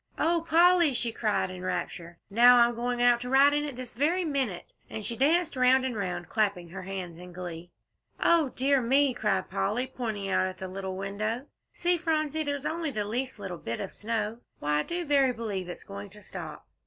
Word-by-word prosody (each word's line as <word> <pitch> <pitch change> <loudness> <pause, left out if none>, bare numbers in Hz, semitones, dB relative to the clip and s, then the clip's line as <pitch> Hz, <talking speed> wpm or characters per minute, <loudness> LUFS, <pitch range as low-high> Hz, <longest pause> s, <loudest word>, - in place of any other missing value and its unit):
"Oh, 335 0 +1
Polly," 340 -3 +5
she 240 -1 0
cried 215 -4 0
in 185 -1 -8
rapture, 175 -2 -4
"now 245 +4 +7
I'm 240 0 +5
going 245 +1 -1
out 240 -1 +5
to 250 - -5
ride 275 +2 +6
on 295 0 +1
it 285 -4 -5
this 250 -1 -7
very 330 +9 +1
minute," 265 - -2 0.2
and 215 - -5
she 235 - -2
danced 320 +6 +2
round 255 +1 +4
and 255 -3 -2
round, 180 -4 -3
clapping 200 -6 0
her 190 +3 -7
hands 185 -3 -6
in 180 0 -10
glee. 175 -1 -7 0.5
"O 330 -5 +4
dear 270 +2 +2
me!" 270 +3 +3
cried 205 -6 -1
Polly, 215 +5 0
pointing 225 -6 -4
out 185 -1 +2
of 185 0 -7
the 190 - -6
little 190 0 -5
low - - -6
window. 215 +6 -3 0.3
"See, 350 0 +1
Phronsie, 315 -2 0
there's 285 -1 -3
only 325 -1 -1
the 215 -6 -2
leastest 255 +5 -3
little 190 -4 -6
bit 115 +1 -4
of 195 - -5
snow. 220 +1 -3 0.2
Why, 150 0 0
I - - +2
do 345 0 -3
verily 275 -3 +3
b'lieve 205 -6 -4
it's 175 - -8
going 200 0 -8
to 210 +1 -13
stop." - - -8
235 Hz, 210 wpm, -28 LUFS, 195-280 Hz, 0.5 s, now